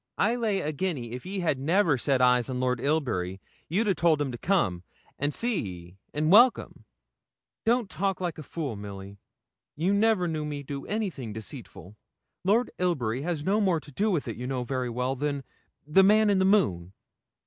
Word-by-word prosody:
I 225 Hz, -, +2 dB
lay 220 Hz, -5 st, 0 dB
a 150 Hz, -, -2 dB
guinea 145 Hz, -7 st, -3 dB
if 125 Hz, +7 st, -7 dB
ye 195 Hz, 0 st, -3 dB
had 155 Hz, -6 st, 0 dB
never 165 Hz, +2 st, +3 dB
set 130 Hz, 0 st, +1 dB
eyes 125 Hz, -1 st, +4 dB
on 125 Hz, -1 st, -3 dB
Lord 125 Hz, -1 st, 0 dB
Ilbury 120 Hz, -, -1 dB, 0.3 s
you'd 205 Hz, +7 st, +1 dB
a 195 Hz, -, +4 dB
told 165 Hz, -2 st, +2 dB
him 145 Hz, -3 st, -1 dB
to 120 Hz, -, -6 dB
come, 165 Hz, -, +1 dB, 0.4 s
and 145 Hz, +1 st, 0 dB
see 235 Hz, +4 st, 0 dB
ye, 90 Hz, -2 st, -9 dB
an' 155 Hz, +2 st, 0 dB
welcome.' 240 Hz, +5 st, +4 dB, 0.8 s
'Don't 235 Hz, -1 st, +2 dB
talk 195 Hz, 0 st, -2 dB
like 175 Hz, -4 st, -3 dB
a -, -, -5 dB
fool, 145 Hz, -4 st, -4 dB
Milly. 100 Hz, -1 st, -9 dB, 0.6 s
You 175 Hz, +6 st, +1 dB
never 205 Hz, -3 st, +3 dB
knew 155 Hz, -2 st, -2 dB
me 145 Hz, -1 st, -5 dB
do 140 Hz, 0 st, -6 dB
anything 185 Hz, -, -3 dB
deceitful. 105 Hz, -, -9 dB, 0.5 s
Lord 220 Hz, +6 st, +2 dB
Ilbury 135 Hz, -10 st, 0 dB
has 160 Hz, -1 st, -2 dB
no 205 Hz, +6 st, +2 dB
more 185 Hz, -5 st, +2 dB
to 150 Hz, -, -14 dB
do 205 Hz, +10 st, 0 dB
with 170 Hz, -10 st, -1 dB
it, 115 Hz, -, -5 dB
you 125 Hz, +1 st, -5 dB
know 130 Hz, -2 st, -2 dB
very 125 Hz, 0 st, -2 dB
well, 125 Hz, +3 st, -1 dB
than 140 Hz, 0 st, -2 dB, 0.4 s
the 150 Hz, +6 st, +5 dB
man 210 Hz, +1 st, +5 dB
in 195 Hz, -, +3 dB
the 190 Hz, -, +3 dB
moon.' 95 Hz, -, +2 dB
150 Hz, 190 wpm, -27 LUFS, 125-190 Hz, 0.8 s, the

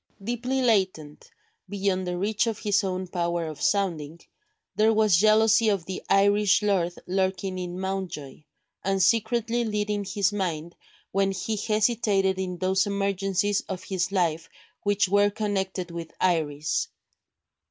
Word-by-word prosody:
Deeply 245 Hz, +4 st, -1 dB
latent, 185 Hz, -10 st, 0 dB, 0.4 s
beyond 190 Hz, -2 st, -1 dB
the 180 Hz, 0 st, -2 dB
reach 210 Hz, +4 st, 0 dB
of 225 Hz, -2 st, -1 dB
his 205 Hz, -1 st, +1 dB
own 185 Hz, -1 st, -2 dB
power 170 Hz, -1 st, -2 dB
of 155 Hz, -2 st, -7 dB
sounding, 160 Hz, -1 st, 0 dB, 0.6 s
there 220 Hz, +1 st, +4 dB
was 215 Hz, -4 st, +4 dB
jealousy 215 Hz, +3 st, +4 dB
of 195 Hz, -5 st, 0 dB
the 185 Hz, +1 st, -5 dB
Irish 205 Hz, +1 st, +4 dB
lord 185 Hz, -4 st, +1 dB
lurking 190 Hz, 0 st, -1 dB
in 180 Hz, 0 st, -5 dB
Mountjoy, 190 Hz, -8 st, -5 dB, 0.4 s
and 195 Hz, -1 st, +1 dB
secretly 230 Hz, +1 st, +1 dB
leading 210 Hz, -2 st, -1 dB
his 200 Hz, +1 st, 0 dB
mind 170 Hz, -4 st, -3 dB, 0.4 s
when 195 Hz, 0 st, +2 dB
he 195 Hz, +4 st, -3 dB
hesitated 210 Hz, -3 st, +1 dB
in 180 Hz, -1 st, -3 dB
those 190 Hz, +2 st, +1 dB
emergencies 200 Hz, 0 st, 0 dB
of 185 Hz, -1 st, -5 dB
his 190 Hz, -1 st, -2 dB
life 165 Hz, -4 st, 0 dB, 0.3 s
which 205 Hz, -1 st, +2 dB
were 205 Hz, +2 st, +4 dB
connected 195 Hz, -4 st, -3 dB
with 170 Hz, -1 st, -7 dB
Iris. 150 Hz, -4 st, 0 dB
195 Hz, 135 wpm, -26 LUFS, 180-210 Hz, 0.6 s, there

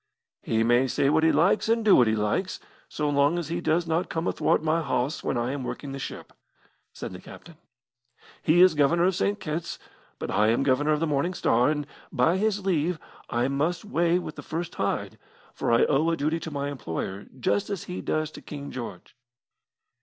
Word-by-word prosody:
"He 115 Hz, 0 st, +1 dB
may 120 Hz, +3 st, +3 dB
say 135 Hz, +2 st, +1 dB
what 160 Hz, +1 st, +3 dB
he 160 Hz, -, +5 dB
likes, 180 Hz, +7 st, +2 dB
and 230 Hz, -1 st, +2 dB
do 205 Hz, -, +7 dB
what 125 Hz, -, +5 dB
he 110 Hz, -, +2 dB
likes, 110 Hz, -, -1 dB, 0.3 s
so 150 Hz, -, -2 dB
long 145 Hz, +3 st, +2 dB
as 170 Hz, -3 st, -3 dB
he 170 Hz, +1 st, -2 dB
does 170 Hz, +1 st, +1 dB
not 165 Hz, +2 st, -1 dB
come 165 Hz, +1 st, -2 dB
athwart -, -, +1 dB
my 160 Hz, +1 st, +1 dB
hawse 140 Hz, 0 st, -1 dB
when -, -, -1 dB
I 120 Hz, +2 st, -1 dB
am 140 Hz, -1 st, -4 dB
working 135 Hz, +2 st, -5 dB
the 135 Hz, -, -6 dB
ship," -, -, -7 dB, 0.6 s
said -, -, -7 dB
the 90 Hz, -, -9 dB
captain. 170 Hz, -3 st, -13 dB, 0.8 s
"He 165 Hz, +3 st, +4 dB
is 185 Hz, -2 st, +7 dB
Governor 155 Hz, +3 st, +3 dB
of 190 Hz, +1 st, +3 dB
St. 205 Hz, +3 st, 0 dB
Kitt's, 165 Hz, +1 st, -4 dB, 0.4 s
but -, -, -5 dB
I 105 Hz, +1 st, +3 dB
am 115 Hz, +4 st, +2 dB
Governor 140 Hz, +3 st, +2 dB
of 150 Hz, -, -1 dB
the -, -, +2 dB
Morning 155 Hz, +4 st, 0 dB
Star, 120 Hz, -2 st, +3 dB
and, 150 Hz, -1 st, -1 dB, 0.3 s
by 160 Hz, +7 st, +2 dB
his 205 Hz, -1 st, 0 dB
leave, 175 Hz, -2 st, +1 dB, 0.3 s
I 120 Hz, +2 st, +1 dB
must 155 Hz, +8 st, -1 dB
weigh 170 Hz, -3 st, +2 dB
with 175 Hz, -4 st, -6 dB
the -, -, -6 dB
first 165 Hz, +1 st, -5 dB
tide, -, -, -2 dB, 0.3 s
for -, -, -1 dB
I 115 Hz, -, +5 dB
owe 150 Hz, +3 st, +2 dB
a 165 Hz, -, 0 dB
duty 155 Hz, +3 st, 0 dB
to 165 Hz, -, -6 dB
my 140 Hz, -1 st, -3 dB
employer, 95 Hz, -, -5 dB
just 100 Hz, -, 0 dB
as 200 Hz, -4 st, -3 dB
he 180 Hz, -, -6 dB
does 155 Hz, 0 st, -1 dB
to -, -, -11 dB
King 140 Hz, -1 st, -8 dB
George." 120 Hz, -2 st, -8 dB
155 Hz, 210 wpm, -26 LUFS, 135-170 Hz, 0.8 s, do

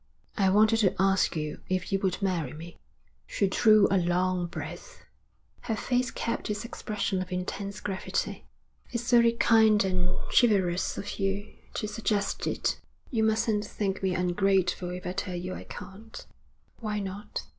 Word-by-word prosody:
'I 195 Hz, -2 st, +3 dB
wanted 215 Hz, +3 st, +5 dB
to 205 Hz, -4 st, +2 dB
ask 195 Hz, -1 st, +3 dB
you 150 Hz, -1 st, -4 dB
if 185 Hz, 0 st, -1 dB
you 195 Hz, -, +2 dB
would 190 Hz, 0 st, -1 dB
marry 170 Hz, -8 st, -1 dB
me.' 165 Hz, +3 st, -10 dB, 0.5 s
She 200 Hz, -, 0 dB
drew 215 Hz, +1 st, +5 dB
a 195 Hz, -, +4 dB
long 180 Hz, 0 st, +1 dB
breath. -, -, -8 dB, 0.6 s
Her 225 Hz, -, -2 dB
face 250 Hz, +2 st, 0 dB
kept 230 Hz, -, -3 dB
its 210 Hz, +1 st, -2 dB
expression 205 Hz, -4 st, -2 dB
of 185 Hz, 0 st, -6 dB
intense 195 Hz, +2 st, -4 dB
gravity. 190 Hz, -2 st, -3 dB, 0.4 s
'It's 240 Hz, 0 st, -2 dB
very 235 Hz, -1 st, +6 dB
kind 220 Hz, -3 st, +5 dB
and 180 Hz, -1 st, 0 dB
chivalrous 190 Hz, -7 st, +3 dB
of 205 Hz, -, -5 dB
you 195 Hz, +1 st, -2 dB, 0.2 s
to 210 Hz, -, -2 dB
suggest 210 Hz, -1 st, -1 dB
it. -, -, -1 dB, 0.3 s
You 225 Hz, -4 st, +1 dB
mustn't 220 Hz, -1 st, +2 dB
think 200 Hz, -2 st, -3 dB
me 190 Hz, -2 st, 0 dB
ungrateful 180 Hz, 0 st, +1 dB
if 180 Hz, 0 st, -6 dB
I 180 Hz, -, -2 dB
tell 185 Hz, -1 st, -3 dB
you 180 Hz, +1 st, -4 dB
I -, -, -8 dB
can't.' 220 Hz, +4 st, -10 dB, 0.5 s
'Why 210 Hz, -2 st, -2 dB
not?' 200 Hz, +2 st, -5 dB
195 Hz, 155 wpm, -28 LUFS, 185-215 Hz, 0.6 s, very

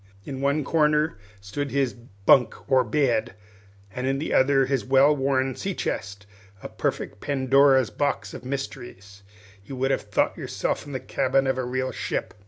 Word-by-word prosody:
In 135 Hz, -1 st, -6 dB
one 140 Hz, +2 st, +1 dB
corner 150 Hz, -3 st, +1 dB, 0.2 s
stood 140 Hz, +9 st, -4 dB
his 135 Hz, -3 st, 0 dB
bunk, 115 Hz, +2 st, +1 dB
or 130 Hz, -1 st, +5 dB
bed, 125 Hz, -7 st, 0 dB, 0.6 s
and 125 Hz, +3 st, -3 dB
in 135 Hz, 0 st, +1 dB
the 150 Hz, -, -3 dB
other 135 Hz, 0 st, +4 dB
his 135 Hz, -1 st, -1 dB
well 135 Hz, +3 st, +4 dB
worn 135 Hz, -1 st, 0 dB
sea 195 Hz, -2 st, -4 dB
chest, 100 Hz, +1 st, -4 dB, 0.4 s
a -, -, -6 dB
perfect 100 Hz, -, -3 dB
Pandora's 135 Hz, -2 st, +3 dB
box 140 Hz, -8 st, -2 dB
of 125 Hz, -, -8 dB
mysteries. 120 Hz, -7 st, -7 dB, 0.4 s
You 130 Hz, -, -8 dB
would 135 Hz, +1 st, 0 dB
have -, -, 0 dB
thought -, -, 0 dB
yourself -, -, -3 dB
in 145 Hz, -, -8 dB
the 130 Hz, -, -2 dB
cabin 135 Hz, +1 st, 0 dB
of 130 Hz, -1 st, 0 dB
a -, -, -1 dB
real 130 Hz, +1 st, -2 dB
ship. -, -, -4 dB
135 Hz, 170 wpm, -25 LUFS, 125-140 Hz, 0.6 s, or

